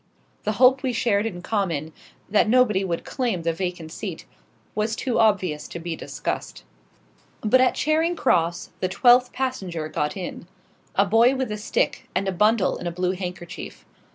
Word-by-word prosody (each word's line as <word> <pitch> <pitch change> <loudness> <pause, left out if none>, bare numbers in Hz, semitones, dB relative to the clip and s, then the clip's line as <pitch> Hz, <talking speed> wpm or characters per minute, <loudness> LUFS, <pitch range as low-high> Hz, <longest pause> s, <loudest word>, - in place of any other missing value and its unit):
The 215 - +1
hope 255 +4 +5
we 260 -3 -1
shared 225 -2 +1
in 175 -5 -7
common 165 -8 -2 0.3
that 210 +1 +3
nobody 225 -5 +4
would 170 -3 -3
claim 235 -10 -2
the 165 0 +1
vacant 175 -2 -4
seat - - -6 0.5
was 215 +1 -1
too 255 -1 -1
obvious 185 -9 +2
to 170 - -7
be 170 0 -4
discussed. - - -5 0.8
But 255 +4 +4
at 255 - +3
Charing 320 +3 +1
Cross 170 - +1
the 185 - -1
twelfth 245 +5 +5
passenger 190 -12 -3
got 150 +4 -2
in 180 -2 -6 0.5
a 200 - +4
boy 230 +5 +4
with 260 -4 -2
a - - -1
stick, 475 - -1
and 195 - 0
a - - +1
bundle 210 +2 +2
in 175 - -5
a - - -1
blue 180 +1 0
handkerchief. 180 -2 -7
200 Hz, 170 wpm, -24 LUFS, 175-245 Hz, 0.8 s, hope